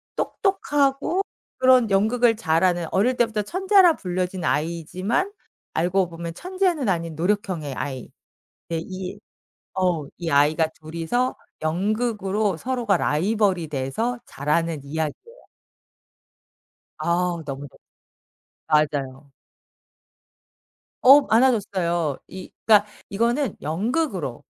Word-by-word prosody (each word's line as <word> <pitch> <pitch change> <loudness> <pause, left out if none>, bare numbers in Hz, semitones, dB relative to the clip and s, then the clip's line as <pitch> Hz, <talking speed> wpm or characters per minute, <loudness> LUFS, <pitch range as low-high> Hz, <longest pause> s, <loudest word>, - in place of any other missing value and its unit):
똑똑하고 290 -3 0 0.4
그런 255 -3 +5
연극을 225 +4 +3
잘 165 -5 +1
하는 175 -2 +2
어릴 245 +6 +2
때부터 225 -3 +1
천재라 375 - +4
불려진 180 -1 -3
아이이지만 180 - -1 0.4
알고 180 +2 +1
보면 170 0 -6
천재는 365 - -1
아닌 165 -3 -1
노력형의 175 -4 -1
아이. 130 -2 -5 0.6
네 165 -1 -1
이 185 0 -7 0.5
어우 175 -6 0
이 170 -2 -4
아이가 150 +3 +3
2 155 +1 -11
이서 240 +11 0 0.3
연극으로 205 +2 0
서로가 240 -2 0
라이벌이 185 +1 +1
돼서 150 - -2
자라는 150 +2 -1
이야기예요. 160 - -5 1.6
아우 170 -1 0
너무 140 0 -6
넙 - - -21 0.9
맞아요. 140 -2 0 1.7
어 275 +3 +9
많아졌어요. 190 - +1
이 185 0 -9 0.2
그니까 210 -2 +6 0.2
이거는 235 +4 0
연극으로, 190 - -2
185 Hz, 240 characters per minute, -23 LUFS, 160-240 Hz, 1.7 s, 어